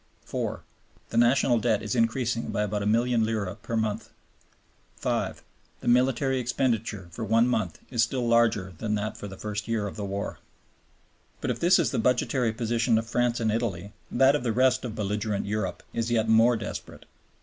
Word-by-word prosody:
(4) - - -3 0.5
The 115 - -2
National 120 0 +4
Debt 110 -2 +1
is 105 - -2
increasing 115 0 0
by 105 - 0
about 105 0 -2
a 100 - -1
milliard 120 +2 +2
lire 110 -4 -1
per 115 - -3
month. 110 -2 -2 0.9
(5) - - -2 0.4
The - - -7
military 130 +2 +3
expenditure 115 -6 -1
for 115 - -6
one 115 +2 +3
month 100 -9 -1
is 120 -3 +1
still 120 +1 0
larger 115 -5 +2
than 105 -1 -1
that 105 +1 -3
for 105 - -7
the 95 -1 -9
first 105 +1 -4
year 115 -3 0
of 100 - -6
the 105 - -4
war. 100 +1 -4 1.0
But - - -1
if - - -4
this 175 +2 +5
is 160 -10 +1
the - - -1
budgetary 125 0 +1
position 115 0 +1
of 115 - -1
France 120 +1 0
and 110 -2 +1
Italy, 105 -4 -2 0.2
that 135 +3 +4
of 150 - -1
the 120 -2 0
rest 130 +2 +3
of 115 -3 -5
belligerent 105 -1 -2
Europe 100 -3 -3
is 115 0 -1
yet 115 -2 +1
more 115 +2 +5
desperate. 105 - -7
115 Hz, 185 wpm, -27 LUFS, 105-120 Hz, 1.0 s, this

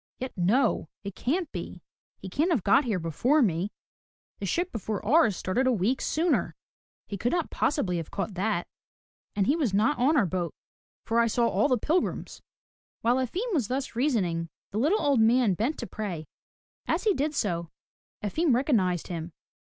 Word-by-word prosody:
"Yet 260 0 -6
no! 210 - +2
It 200 -1 -5
can't 315 - -1
be! 175 -1 -7 0.3
He 190 - -9
can't 295 - 0
have 285 - +1
got 265 +8 +4
here 220 -5 0
before 235 - +2
me. 185 0 0 0.7
The 200 - -3
ship 350 - 0
before 215 -1 -4
ours 235 - +4
started 250 +8 0
a - - +4
week 235 +4 +1
i66 - - -2
FROM 315 - +1
THE 355 - +2
TOWER - - +5
WINDOW - - -2
sooner. - - -16 0.5
He 200 - -5
could 245 - 0
not 345 -3 0
possibly 205 - 0
have 165 -2 -5
caught 200 +1 -3
that. 190 -1 -1 0.7
And 200 - +2
he 280 - +3
was 265 - 0
not 215 +4 +2
on 290 +6 +3
our 200 - +4
boat 175 -1 -3 0.5
for 230 +1 +1
I 235 - +4
saw 235 +1 +2
all 285 - +2
the 255 -3 +2
pilgrims.'* 325 +10 -1 0.6
While 240 +2 +3
Efim 365 - -2
was 265 - +1
thus 260 0 -3
reasoning, 190 - 0 0.2
the 210 - -2
little 325 - +3
old 280 -4 +2
man 225 -1 +4
bent 230 - -1
to 235 - -5
pray. 190 -9 -5 0.6
As - - 0
he 425 -3 +3
did 295 0 -1
so, 170 -8 -1 0.5
Efim 280 - +2
recognized 200 - +1
him. 170 -1 -6
230 Hz, 195 wpm, -27 LUFS, 190-280 Hz, 0.7 s, TOWER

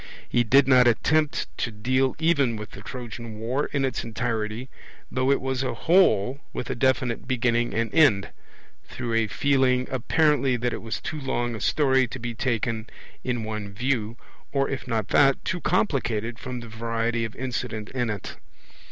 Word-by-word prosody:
He 120 - +2
did 135 +4 +5
not 125 -2 +6
attempt 150 +6 +2
to - - 0
deal 130 +4 0
even 145 -7 +2
with 105 -1 -7
the 100 - -10
Trojan 115 -2 -7
war 125 +6 -1
in 140 -1 0
its 130 -3 -2
entirety, 115 0 -3 0.4
though 130 +1 +1
it 140 - +4
was 130 -1 -2
a 130 - -2
whole 140 - +3
with 125 - -4
a - - 0
definite 130 -1 0
beginning 120 -2 +1
and 115 -1 -1
end 110 -12 +4 0.5
through 120 -2 -5
a 115 -1 +2
feeling 130 +1 +2
apparently 135 0 +2
that 120 0 -1
it - - -5
was 115 0 -4
too 155 - -4
long 120 -3 -1
a 110 - -6
story 130 -3 +3
to - - -7
be 120 0 -4
taken 115 -1 -2 0.3
in 125 -1 -1
in 115 - -4
one 110 -2 -5
view, 115 0 -1 0.3
or 135 -1 +1
if 135 -1 -4
not 110 -4 -1
that, 135 -1 +4
too 175 -2 -2
complicated 120 - 0
from 125 -1 -5
the 120 - -9
variety 115 +1 -1
of 115 -1 -5
incident 125 -4 -4
in 125 -3 -1
it. 105 -3 -5
120 Hz, 180 wpm, -25 LUFS, 115-130 Hz, 0.5 s, not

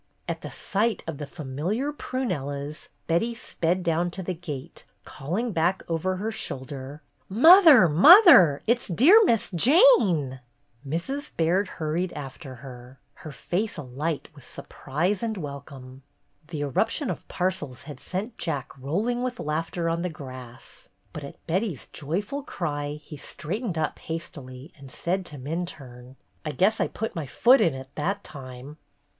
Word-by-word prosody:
At - - -4
the - - -7
sight 215 +1 -1
of 165 -3 -6
the 145 - -5
familiar 175 - -3
prunellas 150 - -4 0.2
Betty 225 +8 0
sped 180 -6 -2
down 170 +1 +1
to 190 +2 -6
the 185 - -3
gate, 155 -6 -8 0.2
calling 190 - -3
back 175 +1 0
over 170 +3 -1
her 210 +4 -3
shoulder: 140 -4 -6 0.3
"Mother! 305 - +8
Mother! 180 - +8
It 235 +1 +2
's - - -5
dear 300 - +6
Miss 230 - +1
Jane 185 - +4 0.2
!" 120 +4 -20
Mrs. 275 - -3
Baird 175 +5 +2
hurried 170 +3 -2
after 135 0 -8
her, 125 0 -11
her 155 - -10
face 180 - -3
alight 145 +3 -4
with 140 -4 -15
surprise 170 +11 -3
and 225 -2 -2
welcome. 140 -4 -9 0.5
The 155 -3 -5
eruption 220 - 0
of - - -8
parcels 180 -9 -3
had 145 -3 -9
sent 205 - -5
Jack 140 -6 -3
roll 160 - -1
ing 245 0 -1
with 250 0 -3
laughter 165 +3 -2
on 165 0 0
the 180 - -2
grass, 130 -5 -11 0.2
but 150 - -7
at 140 - -11
Betty's 180 - -2
joyful 205 - -4
cry 145 - -4
he 150 0 -10
straightened 180 - -5
up 155 -1 -2
hastily 145 -4 -8
and 135 -1 -11
said 185 +5 -2
to 145 - -9
Minturne: 135 -4 -6 0.3
"I 150 - -4
guess 205 +7 +2
I - - +2
put 225 -1 -5
my 160 -4 -4
foot 250 - +5
in 160 -5 +2
it 130 0 -9
that 200 +7 -2
time!" 130 +1 -10
165 Hz, 155 wpm, -26 LUFS, 140-205 Hz, 0.5 s, Mother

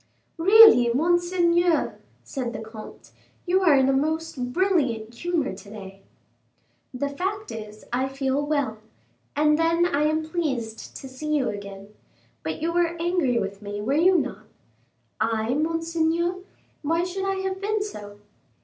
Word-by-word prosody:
"Really, 385 - +8
monseigneur," 345 +3 +2 0.2
said 250 -4 -4
the - - -5
comte, 220 -1 -11 0.3
"you 370 +1 +2
are 335 -6 +5
in 265 -1 +4
a 270 - +3
most 300 -3 -1
brilliant 265 - 0
humor 330 +2 -1
to 200 - -12
day." 195 -2 -10 0.9
"The 265 +2 -2
fact 395 +8 -4
is, 215 -1 -9
I 260 +2 +1
feel 270 +1 -1
well, 285 -7 -1 0.6
and 300 +1 +3
then 335 +1 +3
I 300 -4 +1
am 310 +1 +1
pleased 260 -10 -3
to 270 - -8
see 305 +4 -3
you 265 -4 0
again. 200 -1 -8 0.5
But 160 - -4
you 335 +1 0
were 340 -1 +1
angry 335 -8 +1
with 195 -1 -3
me, 205 0 -5
were 220 +7 -1
you 355 +5 +4
not?" - - -3 0.7
"I, 220 +1 0
monseigneur? 330 +3 0 0.4
Why 330 +3 0
should 375 +2 -3
I 390 - 0
have 380 0 -3
been 420 +1 0
so?" 205 - -9
300 Hz, 150 wpm, -25 LUFS, 235-345 Hz, 0.9 s, Really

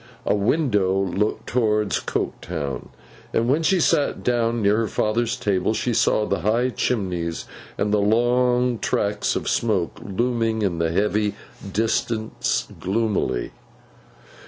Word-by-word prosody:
A - - +2
window 105 - +2
looked 100 +2 -1
towards 105 -4 +1
Coketown; 75 -6 -4 0.4
and 115 - +1
when 145 +6 +2
she 180 +3 +3
sat 155 -3 +1
down 120 -1 +1
near 100 +1 +4
her 115 -1 +1
father's 115 +3 0
table, 100 +1 0
she 120 - -1
saw 105 -1 +2
the 100 - -1
high 115 +5 +1
chimneys 90 -10 -2 0.3
and 105 0 0
the 105 - +3
long 120 +2 +2
tracts 105 0 0
of - - -3
smoke 100 -7 0
looming 115 +1 0
in 85 -4 0
the 85 0 +1
heavy 105 +2 +1 0.4
distance 110 +1 -1
gloomily. 95 - -1
110 Hz, 130 wpm, -23 LUFS, 100-120 Hz, 0.4 s, near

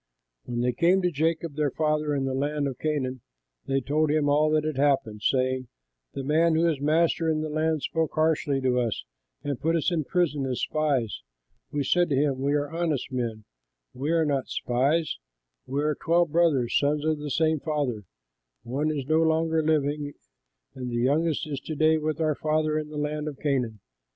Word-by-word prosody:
When 120 -1 -2
they 125 +1 +2
came 180 +8 +3
to 180 - +2
Jacob 160 +1 -1
their 150 -1 +1
father 150 0 0
in 135 -1 0
the 135 - -1
land 145 +2 -1
of 130 -3 -6
Canaan, 130 -5 -2 0.5
they 135 0 +1
told 150 +3 +1
him 150 -1 +2
all 150 +2 +3
that 155 0 +2
had 155 -3 -2
happened, 135 -7 +1
saying, 130 0 +1 0.5
"The 135 - -3
man 160 +4 +3
who 165 +1 +3
is 155 -5 -1
master 160 +2 +2
in 155 -1 +1
that 155 -1 -3
land 155 -1 0
spoke 160 -1 -1
harshly 155 -3 +1
to 125 -1 +2
us 115 -3 -2 0.4
and 140 -3 -3
put 165 +2 +1
us 165 +2 +1
in 165 -3 0
prison 150 -6 0
as 125 -2 -2
spies. 140 - 0 0.5
We 145 -1 -1
said 175 +4 +2
to 140 - +1
him, 135 -1 +1
'We 140 +2 +1
are 145 -1 0
honest 165 -5 -1
men; 115 -4 -3 0.5
we 135 +4 -3
are 165 -1 +3
not 140 -3 0
spies; 140 - 0 0.5
we 140 +3 -1
are 150 0 +2
twelve 170 +1 +1
brothers, 155 -8 +2
sons 145 +1 0
of 155 -1 +1
the 150 0 -5
same 160 +1 +2
father; 135 -9 -2 0.6
one 135 +6 -1
is 145 -4 -2
no 155 +3 +3
longer 160 0 +2
living, 145 -1 0 0.6
and 130 -2 -5
the 120 - -4
youngest 145 +7 +1
is 145 -3 -4
to 155 +3 -6
day 155 +1 +3
with 155 +1 -2
our 155 -1 +2
father 155 +1 0
in 150 -1 -6
the 150 - -7
land 150 +1 -2
of 145 -3 -5
Canaan.' 125 -7 -1
150 Hz, 195 wpm, -26 LUFS, 135-155 Hz, 0.6 s, came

